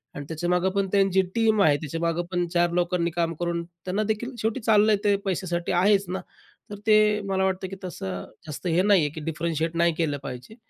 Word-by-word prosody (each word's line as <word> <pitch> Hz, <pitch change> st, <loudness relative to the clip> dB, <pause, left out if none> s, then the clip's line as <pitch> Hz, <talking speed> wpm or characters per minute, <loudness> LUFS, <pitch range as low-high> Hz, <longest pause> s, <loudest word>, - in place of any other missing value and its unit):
आणि 145 Hz, -, -6 dB
त्याच्यामागं 175 Hz, +3 st, 0 dB
पण 195 Hz, 0 st, 0 dB
त्यांची 195 Hz, -1 st, +3 dB
टीम 220 Hz, -2 st, +3 dB
आहे. 145 Hz, -2 st, +4 dB
त्याच्यामागं 165 Hz, +3 st, -2 dB
पण 175 Hz, -1 st, 0 dB
4 175 Hz, 0 st, +2 dB
लोकांनी 175 Hz, -1 st, 0 dB
काम 170 Hz, 0 st, -1 dB
करून 170 Hz, -1 st, -1 dB
त्यांनादेखील 205 Hz, +8 st, -3 dB
शेवटी 220 Hz, +4 st, -1 dB
चाललंय 215 Hz, -1 st, +4 dB
ते 205 Hz, -1 st, +4 dB
पैशासाठी 175 Hz, -2 st, -2 dB
आहेच 195 Hz, +3 st, +3 dB
ना, 185 Hz, 0 st, -3 dB, 0.5 s
तर -, -, -4 dB
ते 215 Hz, 0 st, +7 dB, 0.3 s
मला 190 Hz, 0 st, +1 dB
वाटतं 190 Hz, 0 st, -1 dB
की 195 Hz, -, -6 dB
तसं 95 Hz, -, -5 dB, 0.2 s
जास्त 150 Hz, +4 st, -6 dB
हे 170 Hz, +1 st, +3 dB
नाही 200 Hz, -2 st, +4 dB
आहे 150 Hz, -, +1 dB
की 160 Hz, -, -6 dB
डिफरेंशिएट 165 Hz, 0 st, -2 dB
नाही 170 Hz, 0 st, +3 dB
केलं 155 Hz, -4 st, 0 dB
पाहिजे 130 Hz, -, -8 dB
175 Hz, 190 wpm, -25 LUFS, 165-195 Hz, 0.5 s, ते